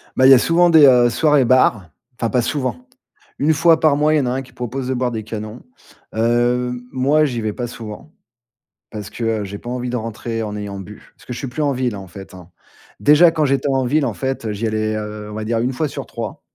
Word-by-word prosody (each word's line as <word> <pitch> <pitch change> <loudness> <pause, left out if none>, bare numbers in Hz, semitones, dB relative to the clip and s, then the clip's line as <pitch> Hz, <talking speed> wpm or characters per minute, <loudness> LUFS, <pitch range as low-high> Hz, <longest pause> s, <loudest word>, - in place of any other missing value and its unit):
Bah 130 - +4
il - - +8
y - - +11
a - - +8
souvent 175 +5 +3
des, 160 -3 +7
heu, 125 -3 +6
soirées 145 +2 +3
bar, 120 -7 +3 0.3
enfin 115 - 0
pas 125 - +1
souvent. 140 - -3 0.5
1 150 +3 +3
fois 165 +2 +4
par 155 -3 +3
mois, 150 +1 +2
il - - +4
y - - +1
en - - -1
a - - 0
un 130 +1 -2
qui 130 - -15
propose 125 +2 -5
de 130 - -1
boire 125 0 -1
des 110 -2 -4
canons. 110 +1 -7 0.5
Heu, 120 +2 +1 0.2
moi, 140 +4 +2
j'y 120 -5 -3
vais 110 -1 -2
pas 120 +1 -4
souvent, 115 +5 -10 0.8
parce 105 -2 -7
que, 120 - -7 0.2
heu, - - -4
j'ai 100 +1 -7
pas 120 - -9
envie 125 0 -3
de 125 - -2
rentrer 115 0 -4
en 105 -1 -5
ayant 100 -1 -6
bu. 100 +2 -12
Parce - - -20
que 125 - -6
je - - -6
suis 135 - -4
plus 125 +5 -5
en 145 -1 +1
ville 125 -3 -2
hein, - - -7
en 95 - -10
fait, 95 +2 -12
hein. 90 -2 -13 0.5
Déjà 150 +4 +6
quand 160 -1 0
j'étais 140 +1 0
en 135 -1 +1
ville, 145 +3 +1
en 120 - -2
fait, 130 -1 -4
heu, 110 - -2
j'y 110 +3 -2
allais, 110 0 -1
heu, 105 0 -6
on - - -8
va 110 - -4
dire 115 +1 0
1 125 +3 -1
fois 155 +4 -1
sur - - -6
3 - - -6
125 Hz, 265 wpm, -19 LUFS, 110-135 Hz, 0.8 s, y